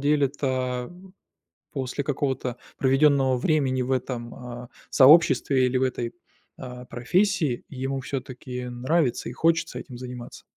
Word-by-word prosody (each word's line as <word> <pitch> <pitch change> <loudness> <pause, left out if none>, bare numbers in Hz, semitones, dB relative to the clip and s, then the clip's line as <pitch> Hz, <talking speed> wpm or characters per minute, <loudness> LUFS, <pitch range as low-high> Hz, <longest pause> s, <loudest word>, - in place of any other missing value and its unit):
деле-то, 135 -3 0 0.8
после 135 +1 -3
какого-то 130 -3 -2 0.2
проведенного 135 -1 +4
времени 130 -1 +1
в 125 - -4
этом, 125 -2 -2
а, 125 -1 -8 0.2
сообществе 135 -2 +6
или 125 0 +1
в - - -1
этой, 125 -2 -1 0.5
а, 125 -1 -8
профессии, 155 - 0
ему 135 0 -3
всё-таки 125 -1 -5
нравится 125 +3 0
и - - -7
хочется 165 +4 +1
этим 125 - -10
заниматься? 125 -1 -8
130 Hz, 120 wpm, -25 LUFS, 125-140 Hz, 0.8 s, сообществе